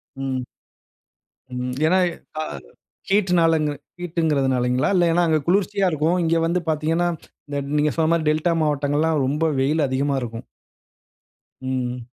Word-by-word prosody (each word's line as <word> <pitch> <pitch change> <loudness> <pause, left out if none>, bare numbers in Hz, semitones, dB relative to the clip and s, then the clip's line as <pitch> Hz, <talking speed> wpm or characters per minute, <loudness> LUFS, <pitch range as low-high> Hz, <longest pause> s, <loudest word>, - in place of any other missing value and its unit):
ம். 135 -1 -3 1.1
ம். 125 0 -3
ஏனா, 180 +4 +4 0.4
அ - - -1 0.7
ஹீட்னால 180 -5 +3
அந்த 150 -1 0 0.3
ஹீட்டுங்கறது 160 -6 0
னாலீங்களா? 125 +3 +1 0.2
ஏனா 175 +1 +3
அங்க 155 -1 +2
குளிர்ச்சியா 195 +1 +2
இருக்கும். 155 +4 +1
இங்க 165 0 +2
வந்து 175 +2 +1
பார்த்தீங்கனா, 160 +3 +1 0.7
நீங்க 150 0 +2
சொன்ன 160 0 +2
மாரி 165 -2 0
டெல்டா 155 +3 +1
மாவட்டங்கள்லாம் 150 +1 +1
ரொம்ப 150 +4 0
வெயில் 145 +2 +2
அதிகமா 140 +2 0
இருக்கும். 115 -1 -6 1.2
ம். 125 -2 -3
155 Hz, 125 wpm, -22 LUFS, 135-165 Hz, 1.2 s, ஏனா